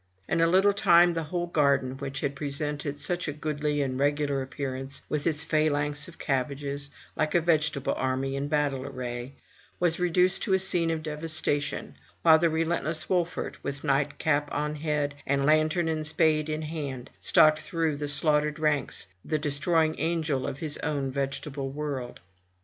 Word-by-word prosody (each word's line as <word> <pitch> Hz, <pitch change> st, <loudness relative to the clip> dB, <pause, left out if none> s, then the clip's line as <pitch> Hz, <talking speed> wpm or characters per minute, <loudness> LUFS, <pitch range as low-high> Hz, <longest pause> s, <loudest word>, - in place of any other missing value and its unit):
In 165 Hz, -, +1 dB
a 165 Hz, -, +5 dB
little 190 Hz, +4 st, +4 dB
time 175 Hz, -4 st, +5 dB
the 165 Hz, -, -1 dB
whole 175 Hz, +3 st, -2 dB
garden, 140 Hz, -5 st, +1 dB
which 135 Hz, -1 st, -4 dB
had 140 Hz, 0 st, -2 dB
presented 145 Hz, 0 st, -3 dB
such 175 Hz, +5 st, -1 dB
a -, -, -1 dB
goodly 150 Hz, -1 st, -1 dB
and 130 Hz, -1 st, -3 dB
regular 145 Hz, -1 st, +1 dB
appearance, 135 Hz, 0 st, -5 dB
with 150 Hz, 0 st, -1 dB
its 160 Hz, -1 st, 0 dB
phalanx 150 Hz, -1 st, 0 dB
of 170 Hz, -, -13 dB
cabbages, 140 Hz, +1 st, -2 dB, 0.3 s
like 155 Hz, +1 st, 0 dB
a -, -, +6 dB
vegetable 155 Hz, -4 st, +1 dB
army 130 Hz, +1 st, -1 dB
in 140 Hz, +1 st, -2 dB
battle 145 Hz, -3 st, 0 dB
array, 125 Hz, 0 st, -6 dB, 0.4 s
was 175 Hz, -1 st, +1 dB
reduced 180 Hz, +1 st, +3 dB
to 195 Hz, -4 st, +2 dB
a -, -, +4 dB
scene 180 Hz, -3 st, +1 dB
of 160 Hz, -1 st, -2 dB
devastation; 150 Hz, -2 st, -1 dB, 0.3 s
while 160 Hz, -1 st, +7 dB
the 170 Hz, 0 st, +3 dB
relentless 160 Hz, -1 st, 0 dB
Wolfert, 175 Hz, -2 st, -1 dB
with 140 Hz, 0 st, -4 dB
night 140 Hz, 0 st, +1 dB
cap 145 Hz, -1 st, +1 dB
on 150 Hz, +1 st, -1 dB
head, 150 Hz, -1 st, -1 dB
and 140 Hz, 0 st, +1 dB
lantern 155 Hz, +3 st, +3 dB
and 155 Hz, -1 st, -1 dB
spade 155 Hz, 0 st, +2 dB
in 155 Hz, 0 st, -2 dB
hand, 140 Hz, -5 st, -5 dB
stalked 155 Hz, -1 st, +5 dB
through 165 Hz, -3 st, -1 dB
the 145 Hz, 0 st, -4 dB
slaughtered 150 Hz, +1 st, +2 dB
ranks, 150 Hz, -2 st, 0 dB, 0.2 s
the 155 Hz, -, -1 dB
destroying 155 Hz, +2 st, +1 dB
angel 160 Hz, -4 st, 0 dB
of 140 Hz, -1 st, -4 dB
his 150 Hz, 0 st, -3 dB
own 140 Hz, -3 st, -2 dB
vegetable 135 Hz, 0 st, -3 dB
world. 140 Hz, -3 st, -5 dB
150 Hz, 165 wpm, -27 LUFS, 140-160 Hz, 0.4 s, while